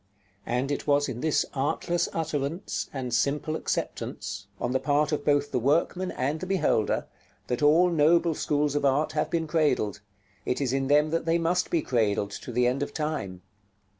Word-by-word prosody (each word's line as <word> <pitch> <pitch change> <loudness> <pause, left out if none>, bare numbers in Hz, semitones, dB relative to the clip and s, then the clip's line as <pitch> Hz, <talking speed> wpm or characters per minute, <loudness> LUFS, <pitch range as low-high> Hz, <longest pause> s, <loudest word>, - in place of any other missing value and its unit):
And 125 +4 -1
it 145 - -3
was 145 0 +3
in 125 -2 -5
this 155 -1 +2
artless 160 +5 0
utterance, 160 +3 -3
and 130 -3 -4
simple 145 +5 0
acceptance, 100 -9 -4
on 120 - -1
the 130 - +1
part 145 +2 +1
of 150 - -1
both 145 -1 +2
the - - +1
workman 165 +8 +1
and 140 +5 -1
the 185 - -5
beholder, 180 - +1 0.4
that 125 +2 -2
all 165 +5 +5
noble 165 +1 +4
schools 145 -1 0
of 145 - -1
art 140 +3 +2
have 155 -1 -1
been 165 -1 0
cradled; 145 - 0 0.4
it 125 - -1
is 135 -3 0
in 135 0 0
them 150 +2 +3
that 165 0 -1
they 165 +1 +3
must 170 +2 0
be 165 -3 +1
cradled 105 -4 0
to 125 - -7
the 125 +1 +2
end 125 +3 +1
of 145 0 -4
time. 145 - -3
145 Hz, 185 wpm, -27 LUFS, 130-160 Hz, 0.4 s, all